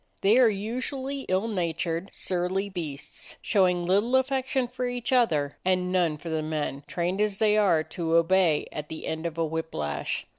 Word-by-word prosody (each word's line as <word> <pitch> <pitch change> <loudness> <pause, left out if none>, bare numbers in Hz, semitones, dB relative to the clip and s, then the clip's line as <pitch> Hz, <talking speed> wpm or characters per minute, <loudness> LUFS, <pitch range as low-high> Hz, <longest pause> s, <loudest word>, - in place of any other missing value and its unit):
They 210 +6 +5
are 245 -3 +7
usually 255 +6 -3
ill 190 +4 +1
natured, 170 -2 -2
surly 185 +2 -1
beasts, 155 -7 -5
showing 180 -3 +2
little 205 +8 +2
affection 260 -1 +1
for 250 +1 -3
each 245 0 -2
other 155 - +2
and 180 0 +1
none 175 -4 +2
for 165 - -8
the 160 -1 -1
men, 155 -2 -3
trained, 180 +3 -1
as 210 -2 +1
they 210 -1 +3
are, 185 -7 +4
to 165 +1 -2
obey 170 -2 +3
at 150 0 -6
the 160 - -6
end 160 +1 -2
of 165 -1 -7
a 165 - +1
whip 160 +1 -4
lash. 75 -1 -2
185 Hz, 180 wpm, -27 LUFS, 160-220 Hz, -, are